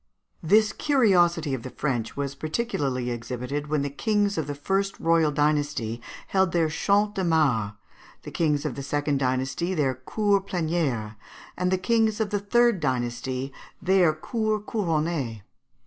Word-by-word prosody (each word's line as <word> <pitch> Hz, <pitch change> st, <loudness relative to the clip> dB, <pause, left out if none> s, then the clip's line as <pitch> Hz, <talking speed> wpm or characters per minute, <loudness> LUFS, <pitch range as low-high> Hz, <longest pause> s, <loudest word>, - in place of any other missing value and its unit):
] -, -, -44 dB
This 215 Hz, -2 st, +4 dB
curiosity 175 Hz, -, +3 dB
of 130 Hz, -, -2 dB
the 130 Hz, -, -7 dB
French 125 Hz, -4 st, -3 dB
was 140 Hz, -1 st, -2 dB
particularly 140 Hz, -, -2 dB
exhibited 125 Hz, +5 st, -4 dB
when 150 Hz, -1 st, 0 dB
the 140 Hz, -, -3 dB
kings 205 Hz, +5 st, +1 dB
of 160 Hz, -5 st, -2 dB
the 145 Hz, -, -4 dB
first 195 Hz, +7 st, -1 dB
royal 165 Hz, -2 st, +3 dB
dynasty 145 Hz, -6 st, 0 dB, 0.3 s
held 190 Hz, -3 st, +2 dB
their 165 Hz, -2 st, +2 dB
Champs 205 Hz, +6 st, +1 dB
de 190 Hz, -, -2 dB
Mars, 140 Hz, -, +2 dB, 0.5 s
the -, -, -8 dB
kings 150 Hz, -3 st, 0 dB
of -, -, -1 dB
the 140 Hz, -, -6 dB
second 145 Hz, 0 st, -1 dB
dynasty 130 Hz, +7 st, -1 dB
their 140 Hz, -5 st, +1 dB
Cours 200 Hz, -, 0 dB
Plenières, 155 Hz, -, -1 dB, 0.4 s
and 180 Hz, 0 st, 0 dB
the 185 Hz, -, +2 dB
kings 220 Hz, +1 st, +1 dB
of 215 Hz, -2 st, -1 dB
the 205 Hz, -, +1 dB
third 235 Hz, +1 st, +3 dB
dynasty 130 Hz, 0 st, -2 dB, 0.3 s
their 185 Hz, -2 st, +4 dB
_Cours 215 Hz, +6 st, -2 dB
Couronnées. 155 Hz, -, -1 dB
155 Hz, 155 wpm, -26 LUFS, 135-195 Hz, 0.5 s, This